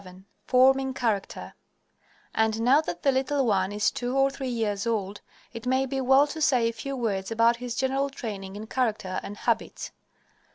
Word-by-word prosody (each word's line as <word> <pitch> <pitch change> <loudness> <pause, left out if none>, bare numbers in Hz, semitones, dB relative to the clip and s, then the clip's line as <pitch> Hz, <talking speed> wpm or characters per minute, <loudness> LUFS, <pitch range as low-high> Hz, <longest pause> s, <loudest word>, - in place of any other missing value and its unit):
XI 185 0 -14 0.2
FORMING 265 +1 +4
CHARACTER 220 -6 -2 0.8
And 220 0 +1
now 270 +5 +5
that 175 - -6
the 275 - +4
little 265 +1 0
one 195 -3 +1
is 210 +1 +1
two 245 +2 -3
or 270 0 +3
three 270 -1 -5
years 220 -3 -2
old, 205 -3 -2 0.3
it 230 +1 -7
may 260 +1 +2
be 270 0 -3
well 265 +2 +5
to 305 +2 -7
say 250 -5 +3
a 230 - -2
few 275 +5 -5
words 200 -6 -2
about 230 +1 +3
his 245 -1 -5
general 270 +1 0
training 200 -7 -7
in 210 +1 -7
character 220 -6 -1
and 205 - -8
habits. - - -2
235 Hz, 180 wpm, -26 LUFS, 210-265 Hz, 0.8 s, now